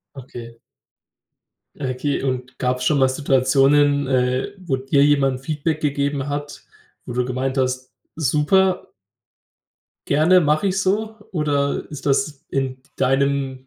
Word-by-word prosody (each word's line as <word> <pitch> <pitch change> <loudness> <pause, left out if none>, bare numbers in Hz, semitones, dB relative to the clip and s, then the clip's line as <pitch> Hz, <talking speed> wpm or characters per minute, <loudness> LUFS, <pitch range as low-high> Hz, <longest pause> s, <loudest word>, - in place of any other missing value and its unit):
Okay. 120 -3 -10 1.2
Ja, 135 -3 -4
okay. 135 +3 -2
Und 130 -1 -3
gab's 125 0 -1
schon 150 - +3
mal 130 - +5
Situationen, 140 +1 +3
äh, 130 +6 0
wo 180 -8 -2
dir 135 +2 +2
jemand 135 -3 +2
Feedback 155 +2 -2
gegeben 140 -1 -1
hat, 145 0 -5 0.4
wo 120 - -6
du 125 +1 0
gemeint 130 +2 -2
hast: 130 -1 -1 0.2
„Super 165 +6 +2 1.2
gerne, 160 +6 +4
mache 155 +5 +2
ich 190 0 0
so?“ 215 +3 -1 0.2
Oder 145 -4 0
ist 145 -2 -8
das 140 0 0
in 130 -1 -2
deinem 135 0 0
140 Hz, 125 wpm, -21 LUFS, 130-150 Hz, 1.2 s, mal